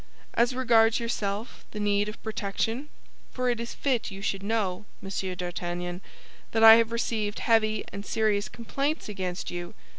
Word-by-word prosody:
As 240 +2 +2
regards 230 -3 +4
yourself, 220 -1 -3
the 210 - -7
need 205 0 +1
of 215 - -10
protection; 220 +6 -2 0.4
for 255 -1 0
it 240 - -2
is 235 0 -5
fit 260 -5 0
you 195 -1 -8
should 195 -1 -1
know, 200 -2 -1
Monsieur 190 -1 -3
d'Artagnan, 175 0 -4 0.5
that 225 0 +3
I 225 0 +11
have 230 0 +2
received 220 -3 -1
heavy 215 -2 +2
and 200 0 -5
serious 210 -1 +1
complaints 275 +7 -2
against 185 -3 -4
you. 175 0 -6
215 Hz, 155 wpm, -27 LUFS, 195-230 Hz, 0.5 s, I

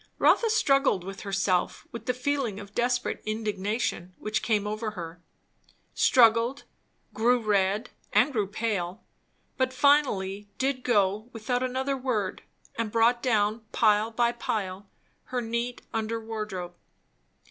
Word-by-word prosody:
Rotha 460 - +4
struggled 275 - +3
with 195 +1 -7
herself 195 -2 0
with 230 +1 -8
the 250 - +1
feeling 255 -5 -1
of 200 0 -11
desperate 245 +1 0
indignation 210 -3 -2
which 215 0 -2
came 210 -3 +1
over 215 +1 -3
her; 165 0 -7 0.7
struggled, 235 +2 +4 0.5
grew 245 +3 +3
red 205 0 +1 0.2
and 280 +3 +3
grew 210 -5 0
pale, 195 -4 -3 0.5
but 260 0 +1
finally 210 -8 +2
did 265 -1 -1
go 210 -1 +1
without 245 +2 -1
another 260 +2 -1
word; 245 -7 -2 0.4
and 225 -2 -1
brought 230 +2 +3
down, 220 -2 +1
pile 215 0 +3
by 235 +1 +2
pile, 200 -4 -4 0.4
her 250 - -2
neat 235 +1 -3
under 225 +1 -1
wardrobe. 215 -5 -5
225 Hz, 125 wpm, -27 LUFS, 205-245 Hz, 0.7 s, Rotha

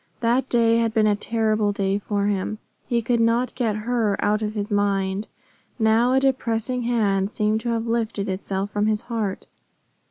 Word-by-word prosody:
That 245 +3 +1
day 230 -1 +3
had 230 -1 0
been 220 -1 +4
a 210 -1 +3
terrible 215 -1 0
day 200 0 -1
for 200 0 -1
him. 205 +1 -1 0.3
He 235 -1 0
could 235 +1 +1
not 230 +2 +2
get 225 -5 -1
her 230 -4 +1
out 210 +1 +1
of 215 0 -3
his 205 0 -3
mind. 200 0 0 0.5
Now 230 +2 +3
a 265 - +4
depressing 250 -2 0
hand 205 -5 +1
seemed 215 0 0
to 235 - -3
have 230 -1 -1
lifted 225 -3 -1
itself 195 +1 -3
from 210 +1 0
his 215 0 +1
heart. 225 -5 -3
220 Hz, 180 wpm, -23 LUFS, 205-235 Hz, 0.5 s, been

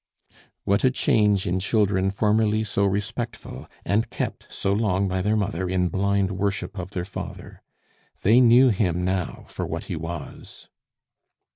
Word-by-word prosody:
What 100 +1 +1
a 130 - +6
change 105 -6 +2
in 90 +1 0
children 95 -1 +1
formerly 110 +2 +1
so 100 -1 0
respectful, 100 +1 -4 0.2
and 110 +3 +1
kept - - -5
so 95 - -1
long 100 -2 +1
by 95 0 -1
their 105 +3 +1
mother 95 -3 -1
in 90 -1 +1
blind 100 +1 +1
worship 100 +1 -2
of 90 0 -5
their 90 -3 -4
father! 95 - -8 0.6
They 115 +6 +6
knew 125 +2 +6
him 90 -5 0
now 90 -2 -2
for - - -5
what - - -4
he - - -5
was. 80 -2 -8
100 Hz, 150 wpm, -24 LUFS, 95-105 Hz, 0.6 s, a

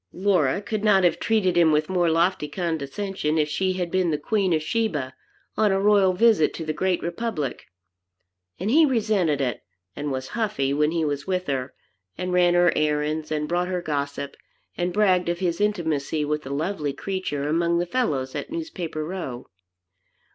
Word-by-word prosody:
Laura 185 -3 +1
could 215 0 -3
not 200 -3 +4
have 175 - +3
treated 215 -5 +1
him 170 -2 +5
with 150 0 +2
more 180 -2 +1
lofty 165 -1 +1
condescension 160 +1 -2
if 150 -1 +2
she 185 +5 0
had 180 -2 -3
been 185 -2 +1
the 150 - +1
Queen 195 +4 0
of 155 -2 +1
Sheba, 155 - -1 0.4
on 215 -2 +3
a 195 - +2
royal 200 -2 +4
visit 205 -5 +3
to 165 - -5
the 155 - -1
great 180 +3 0
republic. 170 - -3 0.9
And 195 +5 -1
he 320 +5 +6
resented 210 - +1
it, 125 -5 -2 0.3
and 145 0 -3
was 130 0 -4
"huffy" 170 - -1
when 150 +1 +2
he 165 -1 0
was 145 +1 -3
with 185 -1 -1
her, 135 -1 -3 0.4
and 180 0 -3
ran 175 -1 +4
her 175 0 +4
errands, 150 +1 0
and 150 -1 -1
brought 175 +2 0
her 180 -1 -1
gossip, 140 -3 -3 0.4
and 175 0 -1
bragged 185 -3 +2
of 175 - 0
his 175 0 -1
intimacy 160 -7 0
with 150 +1 -1
the 135 - -9
lovely 150 0 -2
creature 150 -4 -3
among 170 +2 +1
the 175 - 0
fellows 150 - -1
at - - -5
Newspaper 190 - -4
Row. 155 -9 -6
170 Hz, 180 wpm, -24 LUFS, 150-190 Hz, 0.9 s, he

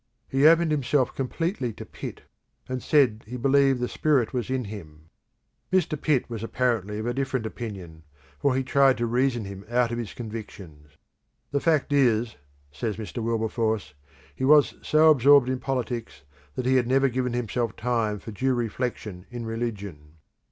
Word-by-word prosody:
He 135 +3 +4
opened 165 0 +5
himself 140 -2 +1
completely 135 - -2
to - - -9
Pitt, - - -8 0.4
and 130 -1 -3
said 125 -7 +3
he 125 +2 -6
believed 135 +1 +3
the 125 - -1
Spirit 135 -6 +1
was 125 0 -2
in 130 -1 -1
him. 80 -7 -10 0.6
Mr. 185 -5 +2
Pitt 145 -3 0
was 115 -3 -6
apparently 115 -4 -1
of 110 - -4
a 120 - -1
different 130 -3 -2
opinion, 95 -8 -7 0.4
for 140 -2 +2
he 135 - 0
tried 135 0 +4
to 120 - 0
reason 120 -1 0
him 100 0 -8
out 120 0 +2
of 120 - -2
his 115 -5 -6
convictions. 95 -10 -9 0.5
"The 140 - +1
fact 150 -2 +1
is," 120 -5 +2 0.4
says 100 +9 -3
Mr. 110 +2 -5
Wilberforce, 110 -5 -1 0.4
"he - - -5
was 145 +1 +5
so 155 +1 +5
absorbed 140 -1 +5
in 130 0 -1
politics 120 - -4 0.3
that 125 - -3
he 130 +1 +4
had 120 -2 +1
never 135 +2 +3
given 125 -1 -1
himself 120 -2 -2
time 115 -3 -1
for 110 +3 -9
due 130 +5 0
reflection 110 -5 -4
in 120 -1 -6
religion. 100 -10 -5
120 Hz, 165 wpm, -25 LUFS, 110-135 Hz, 0.6 s, opened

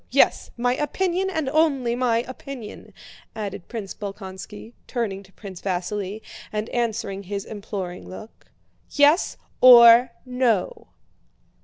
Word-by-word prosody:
Yes, - - +3
my 245 +1 +1
opinion, 370 +5 -1
and 315 -7 -2
only 275 -5 +2
my 240 -2 +1
opinion," 255 -3 -9 0.4
added 200 -4 -6
Prince 215 -5 -6
Bolkónski, 200 +2 -8
turning 215 -6 -3
to 195 -1 -19
Prince 190 -2 -10
Vasíli 195 +2 -3 0.3
and 215 +1 -3
answering 225 -4 -2
his 200 +1 -5
imploring 200 -4 -6
look. 215 +4 -12 0.4
"Yes, 295 +5 +3 0.2
or 240 -1 +9 0.2
no?" 250 -6 0
225 Hz, 115 wpm, -23 LUFS, 200-255 Hz, 0.4 s, or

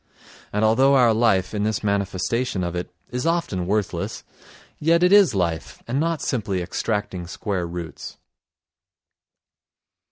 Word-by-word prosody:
And 105 +1 +1
although 130 +5 +4
our 120 -4 +5
life, 110 -5 +2
in 105 - -1
this 110 +1 -1
manifestation 100 +1 -1
of 85 -1 -3
it, 90 - -4 0.2
is 125 +6 -2
often 150 - -1
worthless, 105 0 -2 0.6
yet 165 +3 +3
it 180 +2 +5
is 200 - +6
life 85 -4 -2
and 130 +4 -1
not 165 0 -1
simply 105 -7 -1
extracting 95 0 -3
square 90 0 -3
roots. 85 -1 -7
105 Hz, 130 wpm, -23 LUFS, 95-130 Hz, 0.6 s, is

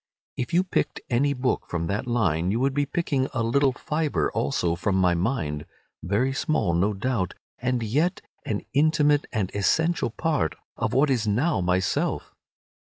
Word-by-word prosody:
If 125 - -3
you 175 +2 +4
picked 165 -5 -1
any 140 +4 +2
book 125 0 -1
from 85 -1 -2
that 100 +7 -2
line 90 -8 +1
you 110 +4 0
would 135 +1 +1
be 145 0 0
picking 140 -4 0
a 120 - +1
little 135 +4 +3
fibre 150 +3 -1
also 85 +5 0
from 95 +3 0
my 90 -2 +3
mind, 85 - -1 0.3
very 115 +9 0
small, 140 - 0
no 95 +5 +2
doubt, 105 -3 -1 0.2
and 125 -1 0
yet 150 +11 +1 0.2
an 105 -2 -3
intimate 150 0 +3
and 100 -5 -1
essential 160 +9 +1
part 145 - -1 0.2
of - - -2
what 140 +2 +3
is 115 -4 +1
now 130 - +1
myself. 90 +1 0
120 Hz, 160 wpm, -25 LUFS, 95-145 Hz, 0.3 s, you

